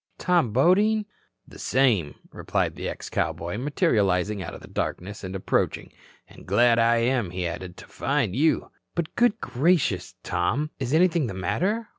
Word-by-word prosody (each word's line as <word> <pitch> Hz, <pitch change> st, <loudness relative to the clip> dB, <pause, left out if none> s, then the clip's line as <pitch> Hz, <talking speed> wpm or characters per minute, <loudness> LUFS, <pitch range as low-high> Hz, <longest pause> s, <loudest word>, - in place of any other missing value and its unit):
Tom 175 Hz, -10 st, +2 dB
Bodine?" 205 Hz, -, +3 dB, 0.4 s
"The -, -, -14 dB
same," 115 Hz, -, +2 dB, 0.2 s
replied -, -, -1 dB
the -, -, -4 dB
ex -, -, -7 dB
cowboy, 85 Hz, +6 st, -2 dB
materializing 105 Hz, -, +1 dB
out 85 Hz, -, -6 dB
of -, -, -11 dB
the -, -, -12 dB
darkness, 100 Hz, +4 st, -4 dB
and 95 Hz, 0 st, -5 dB
approaching. 95 Hz, -, -1 dB, 0.3 s
"And -, -, -16 dB
glad 115 Hz, +4 st, +4 dB
I 115 Hz, +1 st, +4 dB
am," 120 Hz, -4 st, +1 dB
he 90 Hz, 0 st, -3 dB
added, 90 Hz, +1 st, -5 dB
"to -, -, -11 dB
find 135 Hz, -7 st, -1 dB
you." 155 Hz, +5 st, +1 dB, 0.2 s
"But, 170 Hz, -2 st, -2 dB
good 240 Hz, -3 st, +2 dB
gracious, 135 Hz, -, +1 dB
Tom, 125 Hz, -, -1 dB
is 130 Hz, -2 st, -3 dB
anything 165 Hz, -2 st, +3 dB
the 100 Hz, -, -6 dB
matter? 205 Hz, -, -1 dB
120 Hz, 160 wpm, -25 LUFS, -, 0.4 s, glad